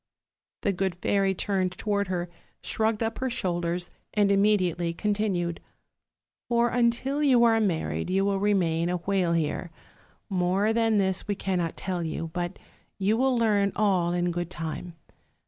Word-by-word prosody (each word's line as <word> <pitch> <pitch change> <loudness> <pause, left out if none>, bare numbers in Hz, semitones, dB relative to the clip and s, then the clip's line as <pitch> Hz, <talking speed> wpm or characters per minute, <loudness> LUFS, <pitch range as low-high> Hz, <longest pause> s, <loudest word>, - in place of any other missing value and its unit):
"The 200 - +1
good 190 -1 -1
fairy 195 +1 +1
turned 185 -1 -1
toward 200 +1 -1
her, 180 -1 -2 0.4
shrugged 220 0 0
up 225 0 -3
her 260 - -1
shoulders, 175 -6 -2 0.2
and 205 -1 +3
immediately 185 -4 +2
continued: 200 -5 -1 0.9
'For 235 0 +3
until 245 +4 +1
you 260 -5 +5
are 225 -1 +5
married 180 -3 -1
you 195 +1 +2
will 200 -1 +1
remain 175 -5 +1
a 180 - 0
whale 180 -1 0
here. 165 +2 -1 0.6
More 190 +3 +1
than 225 -1 +2
this 190 -1 0
we 205 - 0
cannot 180 -4 -2
tell 185 -2 -3
you; 165 0 -4
but 175 -1 -3 0.4
you 200 +2 +2
will 260 +1 +2
learn 205 -3 +2
all 190 -5 +2
in 175 0 0
good 175 0 -3
time. 165 +1 -5
195 Hz, 150 wpm, -27 LUFS, 175-215 Hz, 0.9 s, you